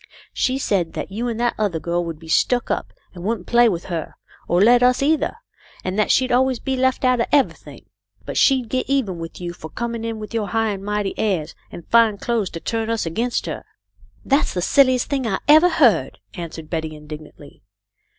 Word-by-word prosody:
" - - -24
She 260 +1 0
said 195 -10 -1
that - - -5
you 230 +5 -3
and 230 -1 -3
that 240 0 +1
other 200 -6 0
girl 175 +2 -1
would 165 -2 -5
be 165 +1 -14
stuck 240 +9 +1
up - - -2 0.2
and 175 -2 -10
wouldn't 210 -2 -2
play 240 0 +4
with 175 -4 -3
her, 170 -4 -5 0.3
or 175 - +2
let 240 +5 +6
us 250 +2 +3
either, 305 +1 +1 0.5
and 185 +3 -2
that 215 - +2
she'd 255 -1 +3
always 260 +1 +3
be 265 +2 -2
left 260 0 +1
out 255 -1 +3
of - - 0
everything. 285 -2 0 0.4
But - - -6
she'd 260 -3 +3
get 255 +2 -2
even 230 -11 0
with 165 0 -8
you 175 -1 -5
for 160 -2 -10
com 235 +4 -4
ing 230 -1 -5
in 230 -1 -3
with 215 +1 -8
your 220 -3 -1
high 225 0 0
and 195 -2 -4
mighty 205 -1 -2
airs 185 -8 -1 0.2
and 170 - -10
fine 230 -3 +4
clothes 225 -3 -1
to 165 - -7
turn 225 +4 -2
us 230 -4 -1
against 230 +9 -1
her." - - -5 0.3
" - - -30
That's 275 -5 +1
the 180 - 0
silliest 255 +3 +3
thing 270 -4 -1
I 195 -3 0
ever 310 +4 +7
heard," 230 - +3 0.2
answered 165 -3 -7
Betty, 160 -1 -4
indignantly. 150 -1 -12
220 Hz, 220 wpm, -21 LUFS, 175-250 Hz, 0.5 s, ever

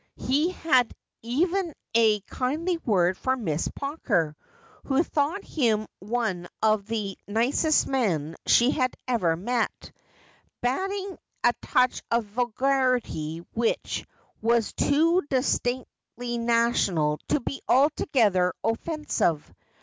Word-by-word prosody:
He 295 +6 +1
had 265 -9 +2 0.3
even 335 - 0 0.2
a 220 -2 +4
kindly 305 - -2
word 185 - +1
for 260 0 0
Miss 165 -9 -1
Pawker, 215 - -1 0.5
who 275 +3 +2
thought 315 +6 -1
him 225 -7 +1
one 200 -4 -2
of 215 -2 +2
the 210 -4 -3
nicest 245 +9 +2
men 170 - 0
she 240 +3 +5
had 255 -2 0
ever 185 -10 +1
met; 230 +7 -2 0.7
bating 380 +10 -2 0.2
a 240 - +5
touch 250 0 +2
of 235 -1 +1
vulgarity 240 - 0
which 230 0 -1 0.3
was 230 0 +2
too 330 +5 +3
distinctly 245 -2 -2
national 230 -10 +2
to - - +2
be 270 +2 -5
altogether 235 -9 +3
offensive. 225 - -1
240 Hz, 105 wpm, -26 LUFS, 210-275 Hz, 0.7 s, she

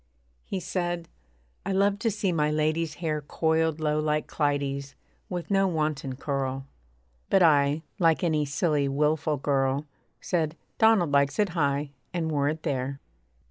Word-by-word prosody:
He 190 - -3
said, 175 -2 -3 0.5
'I 195 - -2
love 200 +1 +2
to 225 +1 +1
see 210 -3 -1
my 150 -3 +1
lady's 155 +1 0
hair 155 -3 -2
Coiled 160 +1 0
low 150 -1 +1
like 150 0 0
Clytie's 140 -2 -1 0.3
with 180 +1 -4
no 195 0 +4
wanton 155 -6 -1
curl.' 135 -1 -2 0.6
But 190 -2 +5
I, 145 -1 +4 0.2
like 165 -2 +3
any 155 -3 +2
silly, 145 0 +1
wilful 150 +2 +1
girl, 135 +1 0 0.3
Said, 165 -3 -1 0.2
'Donald 220 -8 +5
likes 140 0 +3
it 210 -2 +2
high,' 145 -3 0 0.2
and 160 -2 -1
wore 145 -1 +1
it 155 +1 -4
there. 135 0 -2
155 Hz, 145 wpm, -27 LUFS, 140-170 Hz, 0.6 s, But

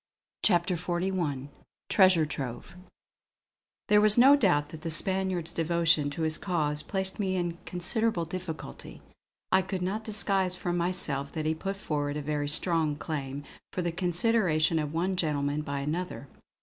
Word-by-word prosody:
CHAPTER 180 -2 +3
XLI 175 -5 -2 0.4
TREASURE 185 -5 +5
TROVE 135 +3 -6 1.1
There 210 0 +5
was 215 +1 +4
no 270 +4 +8
doubt 160 - +2
that 155 0 -10
the 165 - -4
Spaniard's 185 0 +1
devotion 165 -3 +2
to 150 +3 -4
his 155 -1 0
cause 150 -5 -1
placed 190 0 -2
me 190 -2 0
in 175 -1 -1
a 170 - -13
considerable 185 +1 0
difficulty. 165 - -7 0.5
I 190 - +5
could 185 -1 -4
not 205 +4 -2
disguise 195 -4 0
from 175 -1 -3
myself 170 -6 -1
that 155 -1 -3
he 155 - +2
put 195 +5 -4
forward 145 -6 -3
a - - -3
very 145 0 -2
strong 160 -1 +4
claim 145 -2 -5 0.3
for 180 - -2
the 170 - -1
consideration 175 -2 +1
of 150 -1 -3
one 180 +4 -1
gentleman 150 -3 0
by 140 -2 -4
another. 155 0 -4
170 Hz, 155 wpm, -28 LUFS, 150-185 Hz, 1.1 s, no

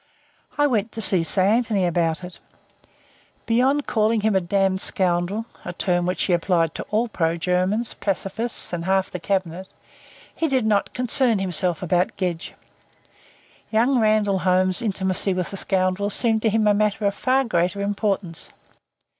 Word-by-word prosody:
I 290 - +3
went 225 -5 0
to - - -6
see 190 -4 +4
Sir 175 +4 +1
Anthony 215 -1 +1
about 170 -1 0
it. 180 0 -9 1.1
Beyond 265 +5 +1
calling 220 0 +1
him 215 -1 +1
a 190 - +3
damned 190 +1 0
scoundrel, 185 +4 +1 0.2
a 175 - -6
term 175 0 0
which 180 - -1
he 185 - +1
applied 170 -2 +1
to - - -5
all 220 +3 0
pro 165 -6 -1
Germans, 185 +7 0
pacifists 200 +3 -2
and 170 -1 -3
half 190 0 0
the 180 - -5
Cabinet, 185 0 -2 0.7
he 325 - 0
did 260 -5 0
not 210 -2 0
concern 250 -2 +2
himself 180 -2 0
about 180 +1 0
Gedge. 180 -3 -4 1.1
Young 240 +4 +2
Randall 215 -3 +2
Holmes's 185 +3 +2
intimacy 190 -3 -1
with 180 -1 -3
the 195 - -6
scoundrel 190 +1 0
seemed 220 +1 +1
to 220 - +2
him 215 0 +1
a 210 - +4
matter 210 0 0
of 200 - +1
far 260 +6 +1
greater 185 -4 -1
importance. 200 -4 -2
195 Hz, 160 wpm, -22 LUFS, 180-220 Hz, 1.1 s, see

